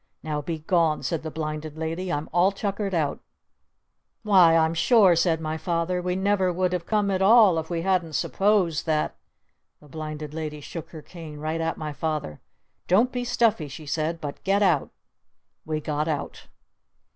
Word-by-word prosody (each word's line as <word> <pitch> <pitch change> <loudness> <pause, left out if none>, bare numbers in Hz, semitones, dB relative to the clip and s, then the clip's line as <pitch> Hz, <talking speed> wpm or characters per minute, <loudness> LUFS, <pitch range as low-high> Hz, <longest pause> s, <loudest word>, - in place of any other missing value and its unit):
Now 150 -1 -2
be 160 +2 -4
gone!" 160 -1 +1
said 165 -3 -2
the 160 - -5
Blinded 155 0 -5
Lady. 165 +3 -3
"I'm 145 +1 -2
all 175 +3 +4
tuckered 200 -1 -3
out!" 150 -4 0 1.0
"Why 185 -6 +6
I'm 160 0 +2
sure," 190 +1 +5
said 165 -1 +2
my 160 0 -3
Father, 170 +2 -1
"we 180 0 -1
never 190 -1 +1
would 180 +1 0
have 175 -2 -3
come 210 -2 +1
at 190 0 0
all 200 -4 +6
if 160 - -6
we 170 -1 -2
hadn't 180 -4 0
supposed 185 -3 +1
that 155 -1 0 0.3
." - - -51
The 150 - -18
Blinded 155 0 -6
Lady 155 -1 -5
shook 160 +2 -8
her 155 -3 -10
cane 160 -4 -10
right 155 +2 -3
at 165 0 -2
my 155 -1 -5
Father. 145 - -3 0.5
"Don't 220 +8 +3
be 245 -1 -3
stuffy!" 230 -9 +1
she 150 +3 -9
said. 160 +3 -2
"But 145 -3 -7
get 200 +1 +2
out!" 170 -8 +2 0.8
We 155 -1 -1
got 150 0 -2
out. 150 -3 -4
165 Hz, 180 wpm, -25 LUFS, 155-185 Hz, 1.0 s, Why